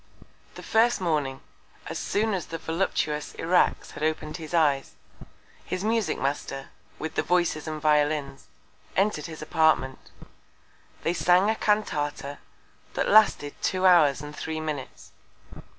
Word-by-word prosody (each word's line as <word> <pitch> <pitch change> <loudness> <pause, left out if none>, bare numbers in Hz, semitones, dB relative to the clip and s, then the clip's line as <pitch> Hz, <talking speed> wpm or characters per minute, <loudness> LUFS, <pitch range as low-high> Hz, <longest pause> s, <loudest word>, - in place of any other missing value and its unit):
The - - -9
first 230 +1 +3
Morning, 150 -7 -1 0.4
as - - -5
soon 215 +1 0
as 185 -3 -3
the 165 - -5
voluptuous 160 -2 -2
Irax 175 +2 +1
had - - -10
open'd 155 0 -2
his 160 -3 -9
Eyes, 145 -5 +2 0.7
his 185 +1 -4
Musick 225 -1 0
Master, 135 0 -3 0.3
with 160 0 -5
the - - +1
Voices 175 -3 0
and 155 -1 -4
Violins, 150 -2 +1 0.5
entred 195 -6 +1
his 160 -2 -8
Apartment. 155 -5 +1 0.9
They 165 - +1
sang 180 +4 +4
a - - -1
Cantata, 145 -10 -1 0.6
that - - 0
lasted 205 -9 +5
two 185 0 0
Hours 155 -6 +5
and 150 0 -8
three 160 +1 -4
Minutes. 150 -4 -6
160 Hz, 135 wpm, -26 LUFS, 150-185 Hz, 0.9 s, lasted